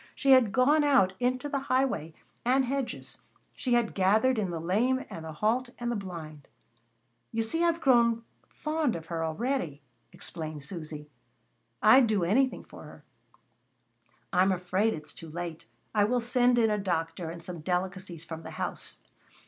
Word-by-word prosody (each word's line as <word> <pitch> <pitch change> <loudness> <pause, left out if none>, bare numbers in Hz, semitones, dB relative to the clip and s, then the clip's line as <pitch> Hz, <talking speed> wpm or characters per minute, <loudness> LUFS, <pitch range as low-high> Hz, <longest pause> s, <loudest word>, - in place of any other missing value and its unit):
She 275 - +2
had 255 -6 +6
gone 290 +6 +4
out 260 -10 +4
into 255 +2 0
the 280 -1 -1
highway 255 - 0 0.3
and 260 +2 +3
hedges, 270 0 -4 0.3
she 250 - -1
had 240 -2 +2
gathered 215 +6 +3
in 195 -3 -1
the 170 -2 -3
lame 230 +10 +1
and 165 - -7
the 160 - -6
halt 225 +10 0
and 240 0 -2
the - - -1
blind. 165 -7 -7 0.8
"You 225 0 0
see 325 +10 0
I've 335 -1 +2
grown 235 -5 +4 0.3
fond 305 -5 -1
of 165 -1 -6
her, 165 0 -3
a'ready," 165 - -2 0.3
explained 155 -3 -7
Susy. 150 -2 -8 0.7
"I'd 260 -2 +7
do 210 -4 +1
anything 250 +9 +2
for - - -13
her." 150 -1 -13 1.3
"I'm 185 +2 +4
afraid 185 +4 +1
it's 150 -1 -9
too 165 - -10
late. 165 -4 -6 0.3
I 205 -2 +4
will 245 +3 +1
send 245 +1 +3
in 225 -2 +4
a 210 - 0
doctor, 165 -3 -2
and 170 0 -8
some 175 -1 -7
delicacies 180 -1 -3
from 160 -1 -7
the - - -9
house." - - -3
205 Hz, 165 wpm, -29 LUFS, 165-250 Hz, 1.3 s, I'd